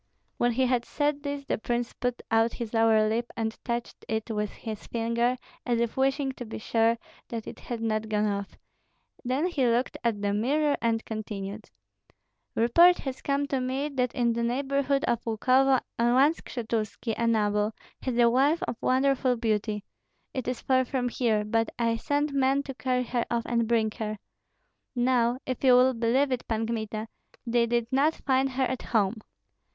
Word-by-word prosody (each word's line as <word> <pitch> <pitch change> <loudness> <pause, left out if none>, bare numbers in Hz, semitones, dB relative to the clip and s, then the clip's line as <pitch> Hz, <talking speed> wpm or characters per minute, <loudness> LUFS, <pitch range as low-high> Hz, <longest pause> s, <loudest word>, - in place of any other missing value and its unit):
When 240 0 +2
he 260 +2 +2
had 245 -1 +1
said 290 +2 -1
this 285 -1 -4
the - - -1
prince 240 +1 -2
put 245 -1 -3
out 225 +1 +3
his 235 -2 -6
lower 225 -1 +4
lip 230 +2 -1
and 220 -1 -1
touched 235 -1 -4
it 220 +1 -2
with 210 -1 -1
his 215 0 -8
fingers, 235 +2 0 0.3
as 240 -1 0
if 235 -1 -1
wishing 270 +1 +1
to 255 - -8
be 225 - -7
sure 225 +1 +2 0.3
that 230 -2 -5
it - - -8
had 235 -2 -5
not 220 -1 -1
gone 210 0 +1
off: 200 -1 -3 0.7
then 260 +6 0
he 345 -7 0
looked 240 +2 0
at 230 -3 0
the 200 0 +1
mirror 285 +8 +2
and 225 -1 0
continued, 210 -1 -6 0.9
"Report 340 +11 +6
has 265 -2 -5
come 280 0 0
to 270 - 0
me 265 +3 -1
that 250 -4 -1
in 235 -1 +2
the 235 - -2
neighborhood 275 +3 0
of 235 -6 0
Lukovo 255 +4 +3 0.2
one 255 +6 +4
Skshetuski, 225 -5 -3
a 235 - 0
noble, 210 -1 +2 0.3
has 255 -3 -2
a 240 -1 +6
wife 275 +7 +3
of 235 - -3
wonderful 260 -1 +2
beauty. 215 -2 -1 0.5
It 260 -3 -4
is 250 -1 -2
far 260 -1 +3
from 250 -1 -1
here; 225 -4 +1
but 225 +1 +1
I 230 -1 +1
sent 290 +4 0
men 275 0 +2
to 275 - -6
carry 255 -1 0
her 240 -1 -1
off 235 -1 0
and 235 -1 0
bring 225 -2 +2
her. 215 -1 -3 0.8
Now, 245 -1 +2
if 255 0 -4
you 260 -2 +7
will 255 +1 +5
believe 245 +4 +1
it, 250 -1 -2
Pan 225 0 -1
Kmita, 220 -1 -3 0.4
they 235 0 +2
did 235 0 +1
not 285 +4 +3
find 265 0 +1
her 265 +1 +1
at 255 0 -3
home." 215 -1 +1
240 Hz, 180 wpm, -27 LUFS, 225-260 Hz, 0.9 s, you